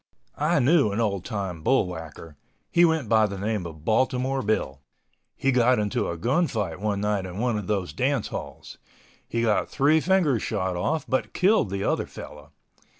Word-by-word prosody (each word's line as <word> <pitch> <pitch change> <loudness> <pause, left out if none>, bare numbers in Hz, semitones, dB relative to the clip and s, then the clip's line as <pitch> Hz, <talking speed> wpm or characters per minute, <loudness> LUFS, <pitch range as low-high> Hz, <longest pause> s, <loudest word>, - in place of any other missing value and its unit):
I 155 +3 +2
knew 140 -3 +4
an 100 - -2
old 100 -5 0
time 95 -7 -4
bull 130 +6 +3
whacker. 80 -3 -9 0.4
He 175 0 +5
went 160 -6 +1
by 110 0 +4
the 100 -1 -6
name 100 -2 -2
of 80 -1 -12
Baltimore 130 +3 +1
Bill. 70 - -1 0.5
He 135 - +1
got 125 0 +4
into 105 -1 -1
a 85 - -4
gun 135 - +1
fight 100 - -3
one 100 -1 -1
night 105 -2 -1
in 90 +1 -8
one 120 +1 0
of 105 -3 -4
those 100 -4 -2
dance 130 -2 0
halls. - - -8 0.5
He 115 0 -1
got 110 -2 +1
three 150 +3 +3
fingers 165 - +2
shot 95 -1 -2
off, 145 - -1
but 130 - -1
killed 190 - +3
the 100 +1 -3
other - - 0
fellow. - - -11
110 Hz, 185 wpm, -25 LUFS, 95-135 Hz, 0.5 s, He